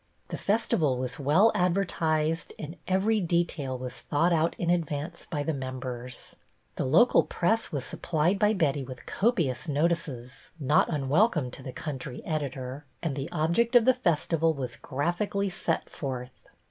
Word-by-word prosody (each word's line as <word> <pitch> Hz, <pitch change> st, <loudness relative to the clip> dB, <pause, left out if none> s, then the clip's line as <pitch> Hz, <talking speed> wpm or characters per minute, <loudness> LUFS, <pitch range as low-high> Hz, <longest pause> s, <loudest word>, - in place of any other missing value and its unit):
The -, -, -4 dB
festival 185 Hz, -, +1 dB
was 125 Hz, +2 st, -4 dB
well 155 Hz, +11 st, +5 dB
advertised 165 Hz, -4 st, 0 dB
and 160 Hz, +2 st, -7 dB
every 195 Hz, +4 st, +2 dB
detail 170 Hz, -6 st, 0 dB
was 125 Hz, 0 st, -6 dB
thought 165 Hz, +4 st, +1 dB
out 165 Hz, 0 st, +2 dB
in 175 Hz, 0 st, +1 dB
advance 165 Hz, -1 st, -2 dB
by 150 Hz, -4 st, -1 dB
the 160 Hz, -, -1 dB
members. 130 Hz, -2 st, -6 dB, 0.4 s
The -, -, -1 dB
local 175 Hz, -, +6 dB
press 220 Hz, +6 st, 0 dB
was 140 Hz, -4 st, -3 dB
supplied 170 Hz, +4 st, 0 dB
by 210 Hz, 0 st, +4 dB
Betty 145 Hz, -8 st, +1 dB
with 130 Hz, -1 st, -9 dB
copious 175 Hz, -, 0 dB
notices 145 Hz, -5 st, -2 dB
— -, -, -30 dB
not 145 Hz, +3 st, +3 dB
unwelcome 150 Hz, -, +2 dB
to -, -, -8 dB
the 130 Hz, -, -6 dB
country 135 Hz, -2 st, -6 dB
editor 140 Hz, -3 st, -3 dB
— -, -, -38 dB
and 160 Hz, -5 st, -1 dB
the 135 Hz, +1 st, -4 dB
object 175 Hz, +9 st, +1 dB
of 240 Hz, -2 st, +7 dB
the 260 Hz, -, +6 dB
festival 165 Hz, -7 st, +1 dB
was 125 Hz, -3 st, -4 dB
graphically 185 Hz, +7 st, -1 dB
set 175 Hz, -2 st, -1 dB
forth. 130 Hz, -3 st, -5 dB
155 Hz, 160 wpm, -28 LUFS, 135-175 Hz, 0.4 s, of